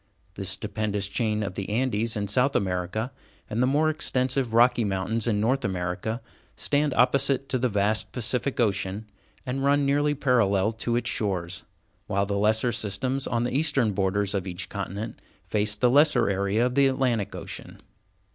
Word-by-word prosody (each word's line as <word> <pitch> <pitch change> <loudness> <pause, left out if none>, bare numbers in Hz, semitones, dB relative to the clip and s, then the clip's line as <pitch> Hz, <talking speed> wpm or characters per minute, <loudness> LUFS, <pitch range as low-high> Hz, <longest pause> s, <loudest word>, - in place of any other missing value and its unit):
The 95 0 -6
stupendous 105 +1 -1
chain 105 0 -1
of 100 -2 -4
the 100 0 -5
Andes 115 -1 0
in 100 -1 -2
South 125 +7 +2
America, 95 +5 -1 0.4
and 110 +3 -2
the 125 - +3
more 150 +4 +2
extensive 130 -4 0
Rocky 120 +1 +4
Mountains 100 +3 -1
in 105 -3 +1
North 130 +5 +1
America, 95 +4 -3 0.3
stand 145 -1 0
opposite 135 +2 +2
to 130 - 0
the 125 +1 +1
vast 105 +1 0
Pacific 125 +3 -2
Ocean, 100 -1 0 0.4
and 135 +1 -2
run 140 0 +3
nearly 145 +1 +2
parallel 115 -7 +2
to 115 +1 -2
its 120 0 -1
shores, 95 -3 -2 0.4
while 100 +1 +1
the 100 - -3
lesser 110 +4 +2
systems 125 +7 -1
on 120 0 0
the 120 +1 -2
eastern 140 -6 +2
borders 100 +1 0
of 100 -2 -2
each 90 +1 -5
continent 100 +2 -5 0.3
face 105 0 0
the 125 +4 +2
lesser 140 -6 +4
area 100 +4 +1
of 125 - -1
the 140 +1 +4
Atlantic 130 -6 0
Ocean. - - -8
110 Hz, 165 wpm, -26 LUFS, 100-130 Hz, 0.4 s, Rocky